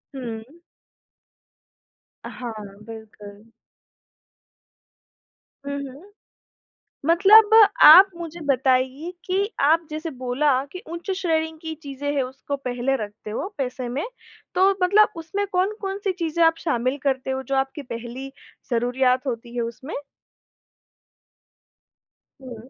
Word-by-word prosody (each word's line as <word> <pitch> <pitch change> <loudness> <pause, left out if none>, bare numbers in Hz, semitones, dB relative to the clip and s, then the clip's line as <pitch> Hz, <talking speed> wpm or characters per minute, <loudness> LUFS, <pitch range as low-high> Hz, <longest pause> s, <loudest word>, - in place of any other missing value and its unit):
हुँ। 250 +5 -8 1.7
अ, - - -6
हाँ, 240 -2 -5 0.3
बिल्कुल। 215 -1 -12 2.2
हुँ, 280 - -3 0.2
हुँ। 330 +10 -15 1.0
मतलब 405 +6 +6 0.4
आप 380 +5 +10
मुझे 340 0 -8
बताइए 265 +3 +1
कि 390 +2 0
आप 320 +3 +3
जैसे 310 +2 -5
बोला 255 +2 0 0.2
कि 365 - -7
उच्च 345 +3 -6
श्रेणी 320 -3 0
की 320 -1 -5
चीज़ें 285 0 -5
है, 275 - +2
उसको 265 +2 -5
पहले 255 0 -2
रखते 210 +1 -11
हो 225 - -3
पैसे 255 -2 -3
में, 270 +5 -3 0.5
तो 375 +2 +4
मतलब 410 +4 +5
उसमें 335 +5 -3
कौन-कौन 390 +1 -1
सी 390 - +1
चीज़ें 340 -2 -2
आप 325 0 +5
शामिल 255 -2 -1
करते 265 -1 -1
हो 265 0 -2
जो 270 +1 -3
आपकी 270 +2 -2
पहली 245 +2 -7 0.4
ज़रूरियात 250 +2 +1
होती 235 -1 -5
है 240 - 0
उसमें? 235 +6 -7 2.5
हुँ। 245 -2 -11
275 Hz, 115 wpm, -23 LUFS, 250-335 Hz, 2.5 s, आप